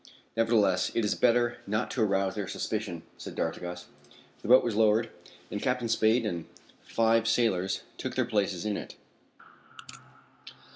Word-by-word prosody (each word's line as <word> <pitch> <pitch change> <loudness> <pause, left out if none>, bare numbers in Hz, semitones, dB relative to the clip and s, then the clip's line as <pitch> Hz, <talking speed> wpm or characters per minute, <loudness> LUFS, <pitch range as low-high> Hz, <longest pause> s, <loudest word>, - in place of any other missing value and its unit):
"Nevertheless, 110 -5 +2
it 115 - +1
is 105 - +1
better 120 0 +2
not 105 +2 -1
to 125 - -1
arouse 95 -2 +1
their 105 -3 -4
suspicion," 105 -7 -4 0.2
said - - -8
d'Artigas. 90 0 -4 0.6
The - - -7
boat 125 +3 +7
was 120 - -1
lowered, 110 +1 +3 0.4
and 105 - -3
Captain 125 -2 0
Spade 115 +1 +3
and 85 -6 -3 0.4
five 115 0 +2
sailors 105 -6 +1 0.2
took - - -4
their - - +1
places 100 -3 -1
in 105 -1 -1
it. - - -8
110 Hz, 145 wpm, -29 LUFS, 100-115 Hz, 0.6 s, boat